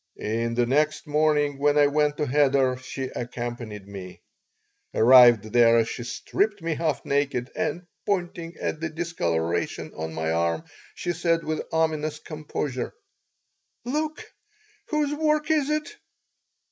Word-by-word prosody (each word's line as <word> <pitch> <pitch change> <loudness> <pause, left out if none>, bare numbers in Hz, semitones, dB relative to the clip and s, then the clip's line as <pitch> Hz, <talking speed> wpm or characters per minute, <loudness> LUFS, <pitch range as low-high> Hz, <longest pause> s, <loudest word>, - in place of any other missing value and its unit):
The 115 +2 -1
next 150 +4 +1
morning 150 -2 +1
when 145 +1 +3
I 145 - +6
went 150 0 +1
to 150 - 0
cheder 135 -2 +3
she 130 +1 -6
accompanied 120 -4 -5
me 95 -2 -9 0.8
Arrived 120 -3 +7
there, 115 -1 +5
she 120 - -5
stripped 205 - -1
me 165 -1 -2
half 155 -2 -1
naked 140 -3 0
and, 175 +1 -2 0.2
pointing 175 -4 -2
at 155 - -3
the 160 0 -2
discoloration 85 - -2
on 80 0 -5
my 80 0 -1
arm, 85 - 0 0.3
she 175 - -2
said, 165 0 +1
with 155 0 -2
ominous 155 -2 0
composure: 150 -4 -4 0.9
"Look! 305 +5 -2 0.6
Whose 300 -1 0
work 305 0 +1
is 300 -2 +2
it?" 305 +6 -1
145 Hz, 130 wpm, -25 LUFS, 120-165 Hz, 0.9 s, Arrived